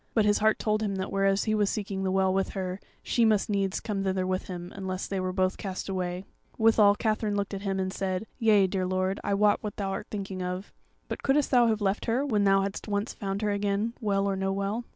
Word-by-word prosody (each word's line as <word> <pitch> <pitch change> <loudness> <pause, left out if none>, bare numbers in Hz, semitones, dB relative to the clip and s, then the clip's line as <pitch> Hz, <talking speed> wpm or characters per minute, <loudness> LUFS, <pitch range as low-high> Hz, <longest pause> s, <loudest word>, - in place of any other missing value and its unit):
But 220 -2 +4
his 205 0 +3
heart 220 +1 +3
told 215 0 0
him 205 -2 -1
that 190 0 -3
whereas 195 0 +2
he 215 - 0
was 210 -2 +2
seeking 200 -2 -3
the 190 - 0
Well 190 0 +2
with 195 0 0
her, 185 0 -3 0.2
she 235 - +1
must 215 -2 +3
needs 195 -2 0
come 205 -3 -3
thither 190 -1 0
with 185 0 -2
him, 175 -1 -7
unless 190 -1 -4
they 195 - -3
were 185 0 -1
both 185 0 0
cast 190 -2 -5
away; 185 -1 -3 0.3
withal 220 -2 +5
Katherine 215 -1 0
looked 200 0 -2
at 195 - -4
him 195 -1 -1
and 190 0 -2
said: 190 +1 -2
"Yea, 215 -4 +5
dear 185 -1 -1
lord, 185 +1 0
I 200 - +1
wot 205 +1 +3
what 210 -1 -5
thou 195 -2 -2
art - - -4
thinking 195 -2 -5
of; 180 +2 -4 0.3
but - - -5
couldest 280 +1 +2
thou 245 -2 +5
have 220 -1 +1
left 200 +1 0
her, 245 +5 +1
when 210 -7 +1
thou 195 0 +5
hadst 195 +2 -4
once 205 +2 -1
found 200 0 -4
her 210 - +1
again, 205 +2 0
Well 200 -2 +1
or 200 -1 0
no 190 0 -1
Well?" 200 +4 -2
195 Hz, 245 wpm, -28 LUFS, 190-210 Hz, 0.3 s, withal